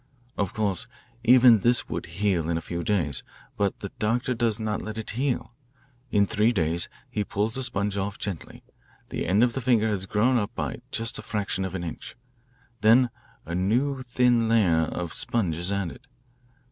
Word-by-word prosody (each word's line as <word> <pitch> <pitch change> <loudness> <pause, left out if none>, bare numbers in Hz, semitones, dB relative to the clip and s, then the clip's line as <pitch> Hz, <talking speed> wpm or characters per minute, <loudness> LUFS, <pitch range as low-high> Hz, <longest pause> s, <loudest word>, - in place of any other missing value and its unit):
Of 100 - -2
course 100 -4 0 0.4
even 120 -1 +7
this 120 +4 +3
would - - -4
heal 85 -1 0
in 85 - +1
a - - -3
few 85 -1 -3
days, 80 - 0 0.3
but 100 -1 -1
the 100 - -5
doctor 120 +4 +1
does 115 -2 0
not 110 -1 -2
let 110 0 -6
it 110 - -5
heal. 125 0 -2 0.6
In 100 -3 +3
three 110 +3 +2
days 85 -5 0 0.2
he 110 -5 -2
pulls 105 +2 -1
the 130 - -1
sponge 100 -5 -1
off 100 +1 -2
gently. 95 -5 -6 0.5
The - - -3
end 100 +6 +4
of 120 -1 +2
the 135 - -3
finger 115 -3 +3
has 95 -2 -2
grown 115 +6 +3
up 105 +2 -4 0.3
just 115 0 -3
a - - -5
fraction 100 -3 -2
of 95 0 -5
an 90 - -3
inch. 85 - -7 0.6
Then 120 +3 +5 0.3
a 85 - -5
new 125 +10 +1
thin 120 -2 +2
layer 90 -8 +4
of 85 +1 -4
sponge 115 -10 0
is 85 +4 -2
added. 100 +6 -4
105 Hz, 180 wpm, -26 LUFS, 95-120 Hz, 0.6 s, even